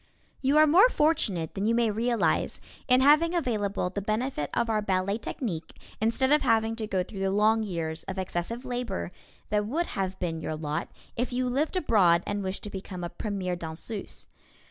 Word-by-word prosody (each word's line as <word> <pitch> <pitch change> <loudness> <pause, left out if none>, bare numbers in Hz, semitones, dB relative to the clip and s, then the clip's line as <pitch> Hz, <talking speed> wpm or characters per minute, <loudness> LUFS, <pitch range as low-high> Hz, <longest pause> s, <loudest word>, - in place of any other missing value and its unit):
You 275 +3 +3
are 310 - +8
more 360 +11 +6
fortunate 210 - +1
than 200 +2 -1
you 230 - +3
may 235 -2 +2
realize 230 +2 0 0.3
in 250 -1 +5
having 305 +5 +5
available 205 - -1
the 200 - -3
benefit 215 - -2
of 235 - +1
our 220 -1 +1
ballet 200 +1 0
technique 185 - -5 0.3
instead 235 +5 +2
of 300 - +5
having 225 -2 +2
to 220 -2 -3
go 190 -3 0
through 195 +2 -9
the 195 0 +1
long 215 +3 +3
years 165 -6 -3
of 195 - -5
excessive 190 +6 -3
labor 245 - -3 0.4
that 210 0 +1
would 325 +9 0
have 190 -1 -2
been 165 -2 -3
your 155 - -3
lot 155 -1 -3 0.3
if 245 +2 -1
you 250 +1 0
lived 280 +8 0
abroad 190 - +4
and 205 0 -2
wished 190 0 -4
to 210 - -6
become 185 -2 -6
a 175 - -3
premier 190 -3 -3
danseuse. 170 +5 -7
210 Hz, 190 wpm, -28 LUFS, 185-245 Hz, 0.4 s, are